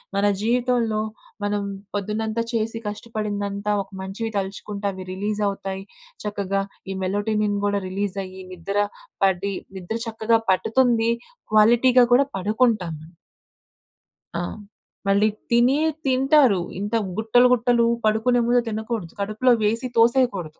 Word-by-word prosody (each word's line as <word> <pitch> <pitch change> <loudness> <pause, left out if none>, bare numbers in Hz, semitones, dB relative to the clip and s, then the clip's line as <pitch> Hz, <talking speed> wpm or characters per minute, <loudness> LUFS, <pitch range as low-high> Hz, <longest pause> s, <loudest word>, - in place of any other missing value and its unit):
మన 200 +1 +2 0.2
జీవితంలో 240 -1 +1 0.4
మనం 205 0 0 0.3
పొద్దునంతా 215 +2 -2
చేసి 225 0 -1
కష్టపడిందంతా 205 -1 -3
ఒక 195 - -24
మంచివి 195 +4 -4
తలుచుకుంటే 200 +1 -4
అవి 190 -1 -8
రిలీజ్ 205 +3 -2
అవుతాయి. 195 -1 -4 0.4
చక్కగా 200 -1 -1 0.3
ఈ - - -3
మెలోటినిన్ 205 +1 0
గూడా 200 0 +1
రిలీజ్ 195 +1 -3
అయ్యి, 190 0 -10
నిద్ర 185 +3 -4 0.5
పడి 195 +1 +2 0.2
నిద్ర 190 +5 -4
చక్కగా 225 0 +1
పట్టుతుంది. 230 +3 +2 0.4
క్వాలిటీ‌గా 240 +3 +6
గూడా 270 +3 +5
పడుకుంటాం 210 -3 +1
మనం. 160 +2 -14 1.3
ఆ! - - -1 0.7
మళ్ళీ 200 +2 +4 0.2
తినేయి 260 +7 +4 0.2
తింటారు. 265 -4 +4 0.2
ఇంత 205 +3 -2 0.2
గుట్టలు, 225 +3 +4
గుట్టలు 240 -1 +3 0.2
పడుకునే 225 +3 +3
ముందు 245 0 +4
తినకూడదు. 220 -5 -4
కడుపులో 215 +5 +2
వేసి 230 +4 +1
తోసేయకూడదు. 230 -9 +2
215 Hz, 115 wpm, -23 LUFS, 200-235 Hz, 1.3 s, క్వాలిటీ‌గా